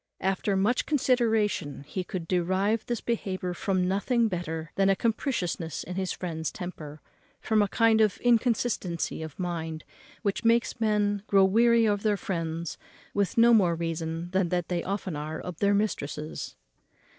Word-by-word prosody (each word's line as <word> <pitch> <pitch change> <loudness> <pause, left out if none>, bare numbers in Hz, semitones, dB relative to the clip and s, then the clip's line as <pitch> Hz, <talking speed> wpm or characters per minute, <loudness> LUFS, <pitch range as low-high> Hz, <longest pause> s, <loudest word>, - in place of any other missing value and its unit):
After 195 +2 0
much 210 +6 +1
consideration 225 - +1
he 165 +6 -4
could 180 -3 -5
derive 190 +5 +1
this 240 -2 -2
behaviour 185 -6 -2
from 185 0 0
nothing 225 +5 +1
better 165 -3 -4
than 195 0 +2
a 195 - +4
capriciousness 190 - -2
in 180 - -6
his 185 -1 -2
friend's 160 -3 -3
temper, 155 -4 -7 0.4
from 220 -1 +2
a 205 - +3
kind 225 +2 +3
of 210 -3 +3
inconstancy 230 -9 +1
of 160 -2 -7
mind, 165 -3 -4 0.4
which 200 -2 -1
makes 230 +1 +2
men 205 -2 +1
grow 195 -1 +5
weary 230 +3 +4
of 205 -2 +1
their 210 -1 +1
friends 165 -3 -4 0.3
with 200 +1 0
no 235 +1 +7
more 180 -6 +4
reason 165 +1 -3
than 190 -2 +1
they 175 0 -1
often 190 -3 -3
are 155 +2 -4
of 180 -3 -7
their 200 0 +3
mistresses. 155 -7 -3
190 Hz, 155 wpm, -27 LUFS, 170-220 Hz, 0.4 s, no